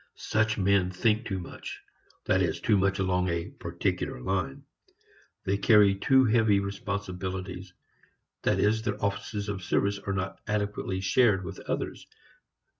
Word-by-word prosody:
Such 110 0 0
men 100 -2 +3
think 105 +4 +1
too 95 - -2
much, 90 - -8 0.5
that - - +3
is, - - 0
too 110 - +2
much 100 0 +2
along 90 -1 +1
a 85 0 -2
particular - - -3
line. 100 - -2 0.8
They 100 +1 0
carry 105 -3 +6
too 130 +7 +4
heavy 110 -3 +4
responsibilities; 95 -2 -5 0.7
that - - +1
is, 110 +2 +2
their 105 -2 -2
offices 100 +1 -3
of 100 -2 -3
service 100 +3 0
are 100 -1 -3
not 95 0 -3
adequately 105 -3 -2
shared 100 -2 +3
with 95 0 -7
others. - - -3
100 Hz, 140 wpm, -28 LUFS, 95-105 Hz, 0.8 s, carry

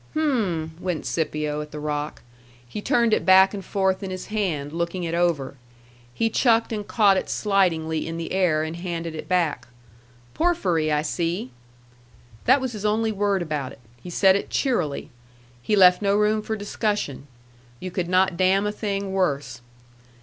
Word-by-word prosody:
"H'm!" 210 - 0
went 180 -4 -3
Scipio 150 -2 -2
at 150 - -8
the 150 - -7
rock. 150 0 -4 0.4
He 165 - -6
turned 235 -3 +2
it - - +2
back 190 +1 +6
and 200 -2 -5
forth 190 -1 0
in 195 - -5
his 185 0 -6
hand, 160 -9 -2
looking 170 +2 -2
it 165 -1 -3
over; 165 -6 0 0.5
he 225 - 0
chucked 230 0 +2
and 210 -2 -4
caught 205 -4 +4
it - - -3
slightingly 165 -7 +1
in 165 0 -4
the 165 - -5
air, 175 -5 +2
and 160 +1 -5
handed 170 -2 -4
it 155 - -7
back. 165 -9 0 0.7
"Porphyry, 185 - +1
I 150 0 +1
see." 165 -3 -2 0.9
That 260 +3 +5
was 260 -2 -3
his 210 -3 -7
only 220 +1 +1
word 200 -2 0
about 150 -5 -4
it. - - -17 0.2
He 180 - -9
said 190 +2 +4
it 200 - -2
cheerily. 180 - -1 0.5
He 210 - +1
left 180 -1 +6
no 200 0 +2
room 210 +1 +2
for 220 +1 -3
discussion. 205 - -3 0.5
You 185 - -6
could 175 -1 -2
not 185 0 +3
damn 190 +2 +3
a 210 - 0
thing 200 -2 -3
worse. 140 -10 -1
185 Hz, 170 wpm, -24 LUFS, 160-205 Hz, 0.9 s, back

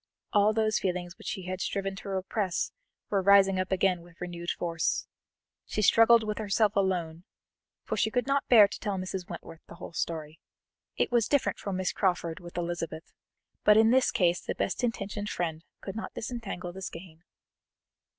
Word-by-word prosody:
All 205 +1 +5
those 215 -1 +1
feelings 180 -2 -3
which - - -12
she 190 - -3
had 185 +1 -4
striven 195 -1 -2
to 200 - -8
repress 190 0 -1 0.4
were 200 -2 +2
rising 195 -1 +5
up 185 0 -2
again 190 -2 +2
with 170 0 -18
renewed 175 -1 -5
force. 165 -2 -1 0.6
She 215 - -1
struggled 230 +2 +6
with 215 0 -3
herself 210 0 +1
alone, 175 -4 0 0.6
for - - -3
she - - +2
could 245 +2 0
not 275 0 0
bear 220 -5 +8
to - - -8
tell 205 -3 -2
Mrs. 185 -1 -5
Wentworth 165 - -9
the - - -11
whole 170 - -9
story; 160 -2 -4 0.6
it - - +1
was 235 -3 +3
different 285 -2 +1
for 200 - -4
Miss 185 -1 -1
Crawford 175 -4 0
with 175 -1 -10
Elizabeth, 170 -2 -4 0.5
but 210 0 +6
in 220 +1 +6
this 260 0 +4
case 175 -1 +2
the - - -4
best 195 - -2
intentioned 210 -3 -2
friend 165 -2 -3 0.2
could 195 - -6
not 220 - -6
disentangle 210 -7 -5
the 190 - -9
skein. 165 -2 -9
190 Hz, 180 wpm, -29 LUFS, 175-210 Hz, 0.6 s, bear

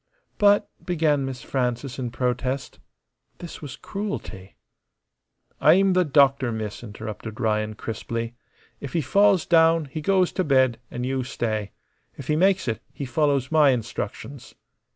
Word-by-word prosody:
"But," 205 0 +5 0.2
began 155 -5 +1
Miss 130 -3 -6
Frances 125 0 -2
in 125 -2 -2
protest. 125 +2 -2 0.6
This 175 - -9
was 145 -4 -7
cruelty. 195 - -6 1.0
"I'm 190 +5 +5
the 180 0 +4
doctor, 140 -4 +3
miss," 110 0 -5
interrupted 110 +1 -7
Ryan, 110 -2 0
crisply. 115 +1 -4 0.5
"If 140 - -7
he 165 - +1
falls 195 +5 +3
down 165 -1 +4
he 150 +3 -6
goes 185 +2 +2
t' - - -1
bed, 130 -7 +3
an' 125 - -5
you 130 0 -1
stay. 110 -4 -3 0.4
If 140 - -9
he 150 - +3
makes 190 -2 +2
it, 110 -2 -2
he 140 - -6
follows 140 0 0
my 155 -3 +5
instructions." 120 +2 -4
135 Hz, 140 wpm, -24 LUFS, 120-160 Hz, 1.0 s, But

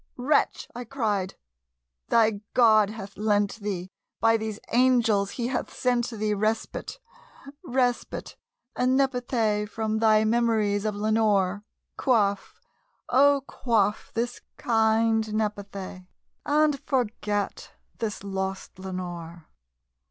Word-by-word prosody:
"Wretch," 260 +5 +1
I 245 - -6
cried, 215 -7 -2 0.7
"thy 220 -3 +3
God 215 -4 +5
hath 200 -2 -9
lent 205 0 +1
thee 190 -4 -4 0.3
by 225 0 +4
these 220 -1 -3
angels 235 -5 +3
he 240 - -4
hath 260 - -3
sent 245 -1 0
thee 215 -2 -1
Respite 215 - -2 0.7
respite 250 -5 -1 0.4
aad 250 - +1
nepenthé 245 -5 +1
from 220 -1 -2
thy 215 -1 +4
memories 220 -3 +1
of 210 -1 -1
Lenore! 205 -2 +1 0.3
Quaff, 205 -6 +1 0.5
oh 280 +2 +4
quaff 215 -6 0
this 240 +1 -2 0.2
kind 225 -1 +2
nepenthé, 200 -3 -4 0.4
and 295 -1 +3
forget 210 -6 -2 0.3
this 215 -4 -3
lost 190 -1 -4
Lenore!" 175 -3 -7
220 Hz, 105 wpm, -26 LUFS, 205-240 Hz, 0.7 s, God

